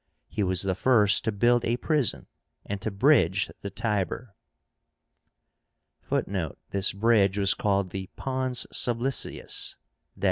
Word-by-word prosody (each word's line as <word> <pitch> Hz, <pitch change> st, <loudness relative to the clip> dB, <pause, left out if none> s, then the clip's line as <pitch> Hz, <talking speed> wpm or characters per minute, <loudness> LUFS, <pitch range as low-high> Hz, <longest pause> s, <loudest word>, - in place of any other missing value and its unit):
He 105 Hz, -, -4 dB
was 95 Hz, -1 st, +2 dB
the 95 Hz, -1 st, 0 dB
first 105 Hz, -2 st, +3 dB
to 110 Hz, -, +1 dB
build 120 Hz, +4 st, +2 dB
a 120 Hz, +1 st, 0 dB
prison, 125 Hz, -, 0 dB, 0.4 s
and 100 Hz, -1 st, -5 dB
to 110 Hz, -, -2 dB
bridge 100 Hz, -, +3 dB
the 100 Hz, -, -5 dB
Tiber. 105 Hz, +2 st, -3 dB, 1.7 s
(Footnote: 90 Hz, -7 st, -2 dB
This 100 Hz, 0 st, +1 dB
bridge 100 Hz, -2 st, +2 dB
was 100 Hz, -1 st, +3 dB
called 100 Hz, -3 st, 0 dB
the 95 Hz, 0 st, -6 dB
pons 130 Hz, -2 st, -1 dB
sublicius 120 Hz, +3 st, 0 dB, 0.4 s
i. -, -, -18 dB
105 Hz, 130 wpm, -26 LUFS, 95-120 Hz, 1.7 s, first